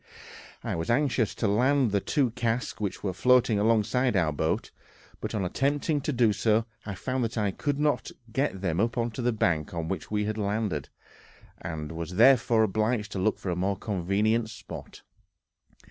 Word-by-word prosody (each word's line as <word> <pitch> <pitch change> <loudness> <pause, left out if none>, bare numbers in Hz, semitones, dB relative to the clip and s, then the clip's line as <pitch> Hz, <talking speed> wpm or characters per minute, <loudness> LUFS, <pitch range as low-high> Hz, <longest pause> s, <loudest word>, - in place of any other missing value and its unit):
I - - -2
was 80 0 -3
anxious 120 -3 +1
to 110 - 0
land 125 +4 +3
the 100 - +2
two 135 0 +1
casks 120 0 -2
which 100 -3 -3
were 95 -2 -1
floating 125 +1 +4
alongside 115 +2 +2
our 85 -4 +2
boat, 80 +2 -1 0.5
but - - -4
on 100 -3 0
attempting 145 - 0
to 150 - -1
do 120 -5 +3
so 110 +1 +2 0.2
I 100 - -4
found 130 +6 -2
that 115 +1 -3
I 105 -2 +1
could 145 +8 -2
not 150 -1 +1 0.2
get 130 -8 -1
them 85 -3 -1
up 115 +2 +1 0.2
the 120 +2 0
bank 85 -7 0
on 80 -1 -3
which 95 - -4
we 105 -1 0
had 110 +1 -2
landed, 100 -8 -1 0.7
and 80 -2 -5
was 85 +2 -5
therefore 115 -1 +5
obliged 110 +1 0
to 95 - -3
look 105 +3 +1
for 95 - -4
a - - -1
more 95 +2 0
convenient 105 +3 0
spot. 110 -1 -10
110 Hz, 175 wpm, -27 LUFS, 95-125 Hz, 0.7 s, therefore